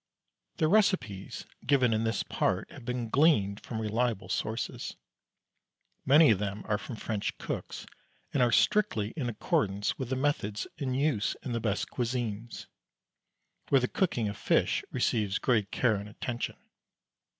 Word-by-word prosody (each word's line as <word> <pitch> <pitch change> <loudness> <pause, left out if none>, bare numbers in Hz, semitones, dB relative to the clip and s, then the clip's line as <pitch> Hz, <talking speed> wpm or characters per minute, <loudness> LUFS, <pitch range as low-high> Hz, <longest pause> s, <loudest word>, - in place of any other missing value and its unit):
_ - - -39
The 160 - +3
recipes 165 - +1 0.2
given 130 -3 +3
in 110 +1 +1
this 115 - 0
part - - -1
have - - -11
been 125 -1 -2
gleaned 110 -7 +3
from 110 - -5
reliable 110 -3 -1
sources. 110 +3 -3 1.1
Many 150 +1 +7
of 100 - +2
them 100 0 -3
are 105 -1 0
from 120 - -7
French 110 -1 -3
cooks, - - -5 0.5
and 140 - +2
are 120 -1 +4
strictly 115 - +2
in 135 -7 -2
accordance 105 -2 0
with 130 -3 -3
the 130 - 0
methods 130 -7 -1
in 130 -3 -1
use 135 -6 +1
in 130 - -4
the 115 - 0
best 105 -3 -1
"cuisines," 120 -2 -3 1.0
where 135 - +6
the 125 - +1
cooking 125 - 0
of 100 - -4
fish - - +2
receives 105 -3 +1
great 110 -6 +1
care 115 -5 +2
and 100 +1 -7
attention. 120 +3 -4
115 Hz, 150 wpm, -30 LUFS, 105-130 Hz, 1.1 s, Many